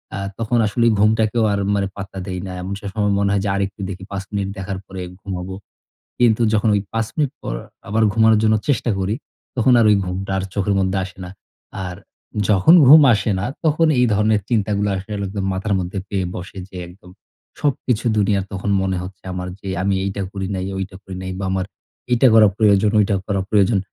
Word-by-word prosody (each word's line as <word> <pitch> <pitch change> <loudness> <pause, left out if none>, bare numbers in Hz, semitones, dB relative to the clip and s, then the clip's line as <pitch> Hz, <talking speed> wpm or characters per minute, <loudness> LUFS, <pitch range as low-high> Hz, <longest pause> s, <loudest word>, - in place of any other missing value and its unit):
আ - - -4 0.2
তখন 115 +1 0
আসলে 115 +3 +1
ঘুমটাকেও 110 +2 +2
আর 100 - 0 0.2
মানে 100 -1 0
পাত্তা 95 -1 -8
দেই 90 -1 -4
না - - -6
এমন 95 +2 -4
সে 100 - -7
সময় 105 -2 +1
মনে 100 0 +1
হয় 100 - +1
যে 100 - 0
আরেকটু 100 0 -3
দেখি। 95 -1 -7
৫ 95 -1 -4
মিনিট 100 -1 -1
দেখার 95 0 -4
পরে 95 -1 -7 0.2
ঘুমাবো। 95 -1 -5 0.6
কিন্তু 120 -2 +4
যখন 110 +1 +2
ওই 100 - +1
৫ 115 -1 0
মিনিট 145 -4 0
পর - - -4 0.3
আবার 110 +2 +1
ঘুমানোর 110 0 +4
জন্য 110 0 +4
চেষ্টা 125 -3 +1
করি, 95 +3 -1 0.4
তখন 125 +1 +4
আর 115 - +4
ওই 105 - +6
ঘুমটা 95 +2 -4
আর 95 - -2
চোখের 100 0 0
মধ্যে 95 0 0
আসে 95 0 -9
না। - - -8 0.6
আর 90 0 -5 0.5
যখন 100 - +5
ঘুম 155 +3 +10
আসে 110 0 0
না, 100 - -2 0.2
তখন 160 +1 +3
এই 125 - +5
ধরনের 105 0 +2
চিন্তাগুলো 105 -2 +1
আসলে 95 +3 -6
একদম 95 0 -4
মাথার 100 +2 -2
মধ্যে 90 +2 -4
পেয়ে 95 -2 -1
বসে। 90 +2 -8
যে - - -14
একদম 90 0 -16 0.5
সবকিছু 125 -5 0
দুনিয়ার 100 -1 +2
তখন 95 +1 -3
মনে 95 -1 -1
হচ্ছে 90 0 -10
আমার 90 0 -4
যে, 100 - -10 0.2
"আমি 100 0 +1
এইটা 100 +1 -3
করি 95 -2 -4
নাই, 95 - -3
ওইটা 95 0 -5
করি 95 -1 -8
নাই। 95 0 -5
বা, 100 - -4
আমার 95 -1 -1 0.5
এইটা 120 +2 +5
করা 110 -1 +7
প্রয়োজন, 105 -1 +4
ওইটা 100 -1 +2
করা 100 -2 0
প্রয়োজন।" 105 0 +3
100 Hz, 205 wpm, -20 LUFS, 95-110 Hz, 0.6 s, ঘুম